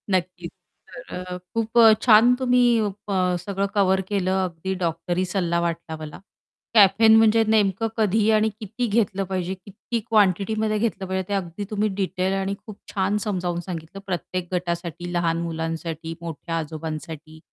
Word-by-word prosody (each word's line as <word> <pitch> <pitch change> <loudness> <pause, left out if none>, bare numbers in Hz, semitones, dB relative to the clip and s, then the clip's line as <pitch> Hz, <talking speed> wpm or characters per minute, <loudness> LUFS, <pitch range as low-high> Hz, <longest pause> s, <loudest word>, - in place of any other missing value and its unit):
नक्कीच. 180 0 -3 0.4
तर - - -11 0.2
अ, 180 0 -5 0.2
खूप 225 -1 0
अ, 225 -2 +9
छान 235 +1 +6
तुम्ही 250 -1 +3 0.5
अ, 185 -2 +1
सगळं 195 +2 -2
कव्हर 190 -1 +3
केलं 190 -2 0
अगदी 180 +2 -4
डॉक्टरी 175 +2 -1
सल्ला 175 -2 0
वाटला 170 -1 -3
मला 155 -1 -8 0.5
कॅफेन 220 +1 +6
म्हणजे 225 0 +5
नेमकं 215 0 +2
कधी 215 0 +2
आणि 215 0 +3
किती 225 +4 -3
घेतलं 205 -3 +1
पाहिजे 185 -1 -3
किती 200 +5 -6
क्वांटिटीमध्ये 215 +1 +2
घेतलं 215 -4 -1
पाहिजे 190 0 -3
ते - - -1
अगदी 190 0 -3
तुम्ही 215 0 0
डिटेल 190 0 -1
आणि 195 0 -1
खूप 215 -3 -10 0.2
छान 200 +1 +1
समजावून 180 -5 -2
सांगितलं 170 +1 -7
प्रत्येक 185 -1 -4
गटासाठी, 175 -1 -3
लहान 170 -1 +1
मुलांसाठी, 165 0 -4
मोठ्या 165 0 -5
आजोबांसाठी 155 0 -6
190 Hz, 145 wpm, -23 LUFS, 170-210 Hz, 0.5 s, अ